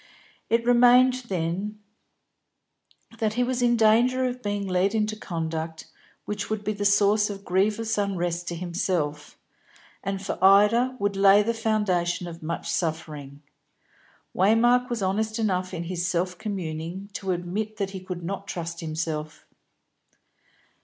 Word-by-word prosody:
It 230 0 +2
remained, 250 +1 +5
then, 185 +3 -2 1.4
that 215 -1 0
he 245 - +2
was 250 0 -1
in 240 -1 +3
danger 240 +4 +4
of 250 0 -3
being 205 -2 -2
led 185 +3 +1
into 215 0 0
conduct 160 -4 -4 0.4
which 210 -1 -4
would 215 -1 -2
be 215 - -1
the 205 0 -3
source 205 +1 +4
of 200 -1 -7
grievous 210 +4 +1
unrest 175 -3 -2
to 170 - -3
himself, 170 -4 -2 0.7
and 195 0 -2
for 190 -1 -5
Ida 210 +6 +5
would 205 -3 -1
lay 195 +1 +6
the 230 +2 0
foundation 210 -6 0
of 170 -1 -8
much 165 +2 -4
suffering. 150 -4 -4 0.9
Waymark 240 +6 +4
was 235 -4 -2
honest 215 +4 0
enough 185 -5 0
in 170 - -4
his 175 0 -3
self 180 +1 -1
communing 180 0 -5
to 195 - -5
admit 195 +5 -3
that 200 -2 -2
he 190 - -6
could 180 -2 -7
not 195 +3 -5
trust 170 -2 -5
himself. 155 -1 -4
195 Hz, 140 wpm, -25 LUFS, 175-215 Hz, 1.4 s, lay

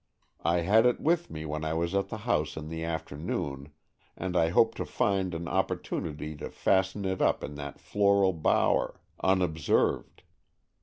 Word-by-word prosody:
I 85 +1 +2
had 110 +7 +5
it 125 - +1
with 170 +2 +1
me 80 0 -6
when 75 0 -3
I 80 0 -1
was 85 +2 -1
at 100 0 0
the 110 - -4
house 80 -12 0
in 80 0 -6
the 80 0 -4
afternoon, 75 -3 -4 0.5
and 90 0 -3
I 80 -2 +4
hoped 115 +6 +3
to - - -2
find 95 -3 0
an 85 +1 -4
opportunity 80 -4 -2
to - - -6
fasten 95 +1 +1
it 95 0 -1
up - - +2
in 75 - -5
that 70 -1 -7
floral 100 -2 +3
bower, 80 -2 +1 0.2
unobserved. 90 -5 +1
85 Hz, 165 wpm, -29 LUFS, 80-95 Hz, 0.5 s, had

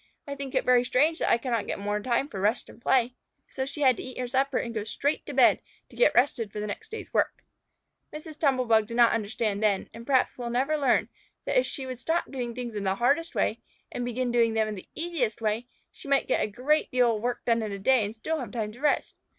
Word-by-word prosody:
I 280 - -5
think 275 -1 -6
it - - +1
very 250 -1 +5
strange 300 +6 +2
that - - 0
I - - +5
cannot 235 -3 -2
get - - -2
more 205 +1 -2
time 245 +5 0
for 195 -9 -6
rest 215 +5 0
and 235 - -15
play." 250 -1 +2 0.4
So 265 0 -3
she 295 +2 -6
had 260 -3 +5
to - - -6
eat 255 - -8
her 250 - -2
supper 270 +1 +1
and 235 - -3
go 215 -2 -2
straight 275 +7 -2
to - - -5
bed - - +5 0.3
to - - -16
get - - +4
rested 240 -4 +2
for 210 - -6
the 210 - -3
next 210 - -6
day's 450 - -8
work. - - 0 0.7
Mrs. 305 0 -9
Tumble 265 -4 +2
bug 220 -2 +3
did 235 - -5
not 235 -1 +6
understand 215 -1 -1
then, 205 -3 +1
and 230 0 -10
perhaps 260 -2 +2
never 245 +5 0
will 305 - -1
learn, 265 -3 +2 0.4
that - - +3
if - - 0
she 270 - -5
would 255 -2 -6
stop 325 +6 -1
doing 245 -4 -4
things 245 -2 -5
in 205 -1 -4
the 190 0 +1
hardest 285 +10 +1
way 225 - 0 0.3
and 245 - -3
begin 245 +1 -2
doing 230 -2 +2
them 220 -1 +2
in 215 - -3
the 195 - -10
easiest 315 -10 -2
way, 225 +2 -1 0.2
she - - -13
might 275 -1 +2
get - - +1
a - - 0
great 265 +8 +1
deal 245 -2 +3
of 210 - -5
work 245 +1 -3
done 230 -1 +2
in 215 -2 -3
a 200 - -4
day 245 +4 +3
and 205 +2 -4
still 315 +8 -3
have 240 -7 -6
time 215 -2 -3
to 235 - -14
rest. 300 - +1
245 Hz, 260 wpm, -27 LUFS, 220-275 Hz, 0.7 s, not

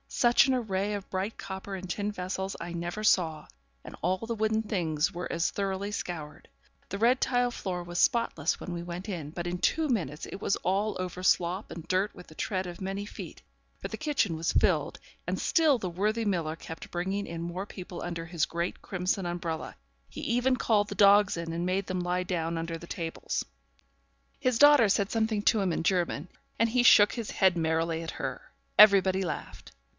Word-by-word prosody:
Such 240 +2 +4
an 265 - +3
array 205 -4 -1
of 200 -2 -7
bright 195 +3 -3
copper 195 0 -6
and 185 0 -7
tin 205 +3 -2
vessels 190 0 -4
I 175 - -6
never 175 +5 -4
saw; 160 -7 +2 0.4
and - - -9
all 185 +2 +1
the 230 +3 -4
wooden 220 0 +1
things 165 -7 0
were 180 +1 -4
as 170 0 0
thoroughly 195 0 -2
scoured. 165 -7 -6 0.4
The 200 - -3
red 240 +5 +3
tile 245 -1 +2
floor 180 -6 -4
was 175 0 -4
spotless 180 - +2
when 180 - -6
we 170 0 -4
went 175 +3 -6
in, 170 -8 -4
but 175 +2 -5
in 175 0 -3
two 315 - +2
minutes 170 - -2
it 195 - -8
was 200 - +1
all 200 +4 0
over 185 0 -4
slop 185 +2 +1
and 165 -1 -8
dirt 185 +4 +1
with - - -13
the 155 - -15
tread 190 0 -2
of 175 0 -8
many 195 +2 -3
feet; - - -9 0.4
for - - -4
the - - -6
kitchen 290 - 0
was 165 +1 -1
filled, - - +1 0.3
and - - -1
still 315 -5 +3
the 190 -5 -4
worthy 210 +6 0
miller 170 -6 0
kept 160 -1 -9
bringing 190 +3 -2
in 165 0 -5
more 175 +4 -4
people 180 -3 -8
under 170 -1 -4
his 165 -1 0
great 170 +2 -3
crimson 190 -2 -2
umbrella. 170 -2 -4 0.3
He - - -8
even 245 +2 +2
called 210 -4 +2
the 200 - -5
dogs 200 -1 +5
in, 165 -1 -4
and 170 +1 -2
made 185 +2 0
them 185 -1 -2
lie 180 +1 0
down 170 -2 -2
under 165 0 -3
the 170 - -11
tables. 165 -2 -3 0.9
His 255 -3 +1
daughter 290 -7 +7
said 200 0 +1
something 220 -2 0
to 215 - +3
him 190 -2 +1
in 165 - -1
German, 175 -3 0 0.3
and 230 +1 +3
he 245 +2 +2
shook 205 -3 +7
his 230 -3 -4
head 190 -2 +3
merrily 165 0 0
at 165 - -5
her. - - -6 0.3
Everybody 195 -2 +7
laughed. 180 - -5
185 Hz, 200 wpm, -29 LUFS, 170-210 Hz, 0.9 s, daughter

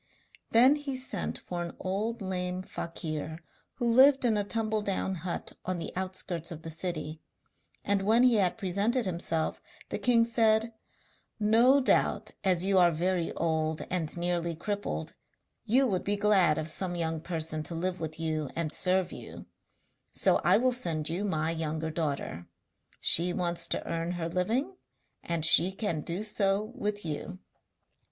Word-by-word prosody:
Then 255 +6 +6
he 285 -2 -4
sent 260 +1 -3
for 175 -1 -5
an 170 -1 -5
old 210 +4 -2
lame 180 -1 -3
fakir 160 -3 -5 0.4
who 240 - -3
lived 260 +3 +6
in 225 -3 +3
a 205 - +1
tumbledown 210 -3 -1
hut 170 +1 -5
on 185 -1 -2
the 165 - -5
outskirts 185 -3 -2
of 160 -2 -8
the 165 - -6
city, 160 -2 -4 0.6
and 200 -1 +2
when 220 +5 +4
he 245 -3 +5
had 190 -1 +1
presented 210 +5 0
himself, 165 -3 -1 0.3
the - - -3
king 235 -2 +4
said: 225 -1 +2 0.7
'No 230 +6 +5
doubt, 265 - +1
as 185 -2 +2
you 195 -1 +4
are 175 -1 +6
very 170 +1 0
old 160 -1 -1
and 175 -3 -1
nearly 170 -1 -1
crippled, 170 - -4 0.5
you 260 +5 +4
would 190 -7 0
be 205 +1 0
glad 195 -7 +4
of 155 0 -2
some 175 +3 -1
young 165 -2 -2
person 160 -2 -1
to 155 +2 -5
live 180 +2 -2
with 160 -1 -5
you 155 -3 -2
and 165 -2 -1
serve 185 +1 +1
you; - - -9 0.7
so - - +3
I - - +4
will 255 +2 +2
send 165 -11 0
you 175 +5 -2
my 160 -5 0
younger 160 -1 -2
daughter. 145 - -3 0.5
She 175 +2 +3
wants 170 -1 -1
to - - -2
earn 165 +1 -2
her 170 -2 -3
living, 230 - -1 0.4
and 170 -2 -2
she 170 +2 +5
can 190 -5 -2
do 170 +7 -3
so 210 0 0
with 210 -6 -3
you.' 160 +4 -5
180 Hz, 160 wpm, -29 LUFS, 165-210 Hz, 0.7 s, Then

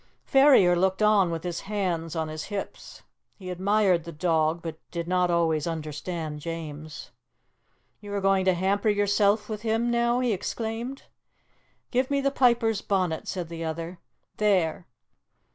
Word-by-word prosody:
Ferrier 270 -11 +6
looked 190 +3 +1
on 210 -4 +4
with 165 -1 -4
his 175 -2 -3
hands 180 -5 -2
on 160 -1 -1
his 155 0 -6
hips. 205 -2 -7 0.3
He 185 -2 -7
admired 190 -1 +2
the 170 - -8
dog, 160 0 0
but 160 -2 -6
did 170 -1 -4
not 180 0 +2
always 165 -2 +1
understand 155 0 -4
James. 155 -1 -7 0.9
"You 205 -1 -10
are - - 0
going 195 -1 +2
to 185 -1 +3
hamper 200 +4 +1
yourself 205 +1 +2
with 215 -2 -5
him 230 +1 0
now?" 235 +1 +2
he 250 -3 +1
exclaimed. 230 +6 -4 0.9
"Give 255 +1 +1
me 280 0 +1
the 275 0 +1
piper's 235 -5 +2
bonnet," 185 -5 -1
said 180 -3 -3
the 165 0 -6
other. 165 +2 -5 0.4
"There! 185 -5 +1
185 Hz, 150 wpm, -26 LUFS, 165-215 Hz, 0.9 s, Ferrier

